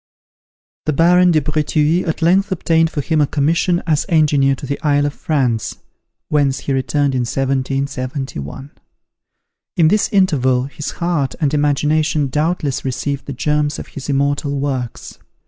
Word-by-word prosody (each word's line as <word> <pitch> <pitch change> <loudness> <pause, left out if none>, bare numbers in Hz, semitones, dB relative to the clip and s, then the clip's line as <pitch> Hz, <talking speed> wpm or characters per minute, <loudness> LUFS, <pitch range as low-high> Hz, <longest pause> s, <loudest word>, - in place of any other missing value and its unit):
The 155 - +2
Baron 180 +4 +4
de 160 -3 +3
Breteuil 155 +3 0
at 160 - -2
length 190 +4 +3
obtained 165 -2 +2
for 150 - -3
him 155 +2 +1
a 145 - +3
commission 165 +5 +1
as 155 -3 0
Engineer 145 -5 +3
to 135 - -8
the 140 +1 -4
Isle 145 -1 +2
of 145 - -2
France, 125 -9 -1 0.5
whence 140 -3 +1
he 140 - -2
returned 140 +1 0
in 130 - 0
1771. 135 - -3 1.1
In 165 -3 +5
this 210 +3 +2
interval, 135 - +2
his 140 +2 -6
heart 170 -6 -1
and 150 -3 0
imagination 150 0 +1
doubtless 150 -1 -1
received 140 +2 -3
the 140 - -4
germs 150 +3 0
of - - -8
his 140 0 -8
immortal 140 0 0
works. 130 -4 -4
145 Hz, 145 wpm, -18 LUFS, 135-160 Hz, 1.1 s, In